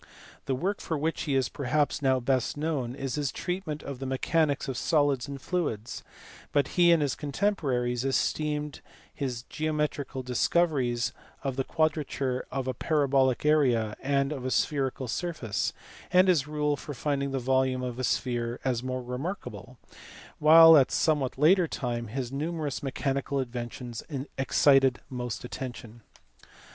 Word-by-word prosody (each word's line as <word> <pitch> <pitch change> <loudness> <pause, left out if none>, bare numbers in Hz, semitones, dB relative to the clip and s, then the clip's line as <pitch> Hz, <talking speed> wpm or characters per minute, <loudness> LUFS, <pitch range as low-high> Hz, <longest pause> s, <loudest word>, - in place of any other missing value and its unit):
The 135 - +1
work 190 +9 -2
for 160 - -2
which 160 +3 -1
he 140 -3 0
is 130 -2 +2
perhaps 145 +4 0
now 130 -2 +3
best 130 +2 0
known 145 -6 -2
is 135 -2 -4
his 145 -3 -1
treatment 170 -3 -4
of 140 -3 -6
the 135 - -4
mechanics 145 +2 +1
of 135 - -3
solids 145 -2 +1
and 140 -1 -6
fluids; 130 - -3 0.5
but 145 -2 +2
he 175 -1 +4
and 165 -3 +4
his 140 -3 0
contemporaries 135 - -1
esteemed 150 +2 -1 0.3
his 125 -4 -4
geo 155 +4 -3
metrical 145 -3 -2
discoveries 125 -1 +1 0.3
of 135 -2 -2
the 135 - 0
quadrature 145 -5 -1
of 130 -1 -3
a 130 - 0
parabolic 135 -2 +1
area 125 -8 +3
and 140 0 +1
of 135 -4 -4
a 130 - -1
spherical 135 -2 0
surface, 130 - -2 0.4
and 185 +1 +5
his 150 -6 +3
rule 150 -1 0
for 145 +1 -8
finding 140 +1 -1
the 135 - -2
volume 130 0 +1
of 125 -1 -4
a - - -2
sphere 120 -2 -1
as 125 -3 0
more 130 0 -3
remarkable; 135 +11 -6 0.6
while 165 +1 +9
at 135 - +4
a - - -2
somewhat 145 -6 +1
later 170 +5 +5
time 120 -5 -3
his 125 +2 -4
numerous 150 0 -3
mechanical 140 0 -2
inventions 120 -1 -5 0.4
excited 135 -1 +4
most 125 -2 -4
attention. 120 -2 -7
135 Hz, 155 wpm, -28 LUFS, 125-150 Hz, 0.6 s, while